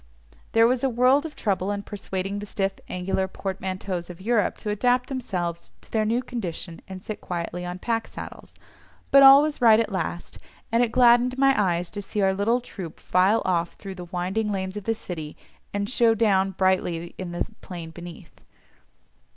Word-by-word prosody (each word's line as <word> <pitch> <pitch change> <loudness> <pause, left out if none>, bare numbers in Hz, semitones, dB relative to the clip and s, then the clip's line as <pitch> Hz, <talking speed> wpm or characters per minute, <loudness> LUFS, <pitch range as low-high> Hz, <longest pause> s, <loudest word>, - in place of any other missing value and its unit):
There 225 0 +6
was 250 +1 +1
a 270 - +3
world 255 +5 +3
of 300 - -14
trouble 195 -2 -1
in 205 0 -2
persuading 195 -1 -4
the 205 - -7
stiff 195 -1 -1 0.2
angular 190 +1 -1
portmanteaus 190 -2 -4
of 175 0 -9
Europe 215 0 +1
to 210 - -4
adapt 245 +4 +1
themselves 180 -10 -4
to - - -15
their 220 -1 +1
new 235 +4 +1
condition 180 -8 -5
and 190 -1 -8
sit 215 - -6
quietly 175 0 -4
on 180 +1 -5
pack 225 +4 -2
saddles, - - -10 0.6
but 275 - +8
all 275 +1 +10
was 300 -3 -3
right 225 -2 +7
at 225 -2 0
last, 175 -2 -4 0.3
and 230 +1 +3
it 240 -2 +2
gladdened 245 +1 +5
my 270 0 +5
eyes 180 -4 0
to 205 - -5
see 205 +1 -5
our 195 -1 +3
little 225 +6 +1
troop 190 -8 -9
file 190 +5 +2
off 170 -2 0
through 195 -1 -8
the 180 -1 -8
winding 190 +4 -2
lanes 190 -1 -3
of 205 -2 -6
the 225 - +1
city, 160 -7 -7 0.3
and 200 0 -2
show 230 -1 +3
down 195 -4 +3
brightly 185 -3 0
in 185 -2 -5
the 175 - -2
plain 170 -3 -8
beneath. 175 0 -11
200 Hz, 185 wpm, -25 LUFS, 180-230 Hz, 0.6 s, all